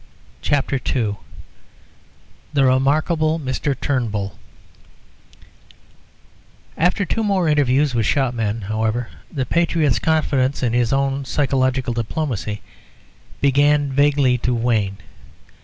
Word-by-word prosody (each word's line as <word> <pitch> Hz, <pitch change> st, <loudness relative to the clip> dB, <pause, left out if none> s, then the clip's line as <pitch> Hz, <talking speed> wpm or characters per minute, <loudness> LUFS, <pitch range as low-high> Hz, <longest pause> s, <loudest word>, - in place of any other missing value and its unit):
CHAPTER 140 Hz, -1 st, 0 dB, 0.2 s
II 105 Hz, -5 st, 0 dB, 1.4 s
The 140 Hz, -2 st, +3 dB
Remarkable 155 Hz, +5 st, +2 dB
Mr. 135 Hz, 0 st, -2 dB
Turnbull 105 Hz, -7 st, -2 dB, 2.4 s
After 180 Hz, +4 st, +1 dB
two 225 Hz, +6 st, -1 dB
more 195 Hz, -5 st, +1 dB
interviews 145 Hz, -2 st, +2 dB
with 115 Hz, -4 st, +1 dB
shopmen, 115 Hz, -6 st, 0 dB
however, 110 Hz, +4 st, -2 dB, 0.2 s
the 135 Hz, -4 st, -2 dB
patriot's 165 Hz, -2 st, +1 dB
confidence 140 Hz, -4 st, +1 dB
in 120 Hz, -2 st, +1 dB
his 120 Hz, -1 st, +1 dB
own 135 Hz, 0 st, 0 dB
psychological 130 Hz, -2 st, 0 dB
diplomacy 115 Hz, -3 st, -3 dB, 0.8 s
began 145 Hz, +1 st, +3 dB
vaguely 140 Hz, -3 st, +3 dB
to 125 Hz, +1 st, 0 dB
wane. 110 Hz, -5 st, 0 dB
135 Hz, 95 wpm, -20 LUFS, 120-145 Hz, 2.4 s, The